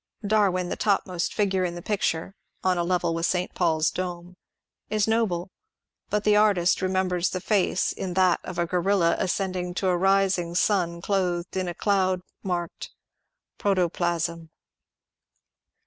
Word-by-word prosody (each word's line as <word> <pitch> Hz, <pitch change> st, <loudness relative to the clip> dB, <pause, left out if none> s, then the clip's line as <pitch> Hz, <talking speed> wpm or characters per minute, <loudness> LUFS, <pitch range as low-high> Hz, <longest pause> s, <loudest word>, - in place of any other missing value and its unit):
Darwin, 195 Hz, -4 st, +2 dB
the -, -, -2 dB
topmost 185 Hz, -4 st, 0 dB
figure 195 Hz, -3 st, +1 dB
in 175 Hz, -1 st, -2 dB
the 175 Hz, -, -7 dB
pic 210 Hz, -2 st, -2 dB
ture 165 Hz, +4 st, -1 dB, 0.3 s
(on 185 Hz, -1 st, +2 dB
a 175 Hz, -, 0 dB
level 175 Hz, -1 st, 0 dB
with 165 Hz, +1 st, 0 dB
St. 180 Hz, 0 st, -1 dB
Paul's 165 Hz, -6 st, +1 dB
dome) 180 Hz, -1 st, -5 dB, 0.6 s
ia 215 Hz, -, 0 dB
noble, 200 Hz, -6 st, 0 dB, 0.6 s
but 210 Hz, 0 st, 0 dB
the 210 Hz, 0 st, +4 dB
artist 200 Hz, -5 st, +3 dB
remembers 185 Hz, -1 st, 0 dB
the 185 Hz, -, -3 dB
face 190 Hz, -1 st, +1 dB
in 180 Hz, -2 st, -5 dB
that 185 Hz, -2 st, +4 dB
of 185 Hz, -, -7 dB
a 170 Hz, -, +1 dB
gorilla 180 Hz, 0 st, +2 dB
ascending 185 Hz, -1 st, -2 dB
to 190 Hz, 0 st, 0 dB
a 180 Hz, -, +2 dB
rising 190 Hz, -2 st, +2 dB
8ui> 175 Hz, -3 st, +1 dB
clothed 180 Hz, -3 st, -1 dB
in 185 Hz, -1 st, -1 dB
a 175 Hz, -, -4 dB
cloud 190 Hz, -3 st, +1 dB, 0.2 s
marked 175 Hz, -3 st, -4 dB, 0.7 s
Protoplasm." 175 Hz, -3 st, 0 dB
185 Hz, 150 wpm, -25 LUFS, 175-195 Hz, 0.7 s, the